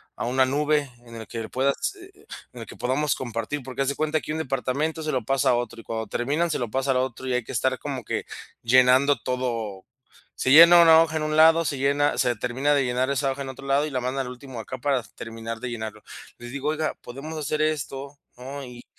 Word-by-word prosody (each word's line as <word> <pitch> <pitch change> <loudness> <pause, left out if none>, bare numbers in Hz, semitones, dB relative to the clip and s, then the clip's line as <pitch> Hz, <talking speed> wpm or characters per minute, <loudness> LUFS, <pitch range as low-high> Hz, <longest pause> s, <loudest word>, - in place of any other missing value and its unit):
a - - -4
una 130 +2 +3
nube 145 +1 +1 0.2
en 115 0 -12
el 110 -1 -8
que 115 -2 -6
puedas, 140 - 0
eh 375 0 -14
eh, 400 +2 -22 0.3
en 120 - -9
el 115 - -7
que - - -11
podamos 130 +5 0
compartir". 120 +3 -4
Porque 130 +1 -5
haz 135 - +1
de 140 - -2
cuenta 155 0 0
que - - -6
un 155 - -2
departamento 140 +3 -2
se 155 - -1
lo 130 -3 -1
pasa 135 +1 +2
a 125 - +4
otro, 120 -1 -4
y - - -21
cuando 110 -1 -4
terminan 150 +8 -1
se - - -1
lo 120 -3 -3
pasa 135 +1 0
al 130 - +2
otro, 130 0 -3
y 125 - 0
hay 125 -1 0
que - - -9
estar 130 +2 +1
como 135 -5 -5
que - - -3 0.4
llenando 130 +3 +5
todo. 115 -6 -3 0.5
Se 130 - 0
llena 170 +3 +9
una 165 -1 +8
hoja 160 -1 -3
en 155 - -2
un 155 0 -1
lado, 165 +1 +6
se 140 - -1
llena 140 +2 +1
se 125 -2 +2
termina 130 +6 0
de 140 -2 +2
llenar 125 +2 0
esa 140 0 0
hoja 140 +1 -6
en 135 - -7
otro 135 +1 -9
lado 140 +2 +2
y - - -4
la 130 - -1
mandan 130 +2 -2
al - - -6
último 125 -1 -9
acá 130 +4 -7
para 135 -2 0
terminar 115 +1 -8
de 125 - -5
llenarlo. 110 -2 -6 0.4
Les 120 0 -9
digo: 140 +2 -2
"Oiga, 155 0 -1
podemos 145 +6 -8
hacer 155 +1 -2
esto, 140 -2 -2 0.2
¿no? 135 +3 -7
Y 125 -1 -11
135 Hz, 245 wpm, -25 LUFS, 125-145 Hz, 0.5 s, llena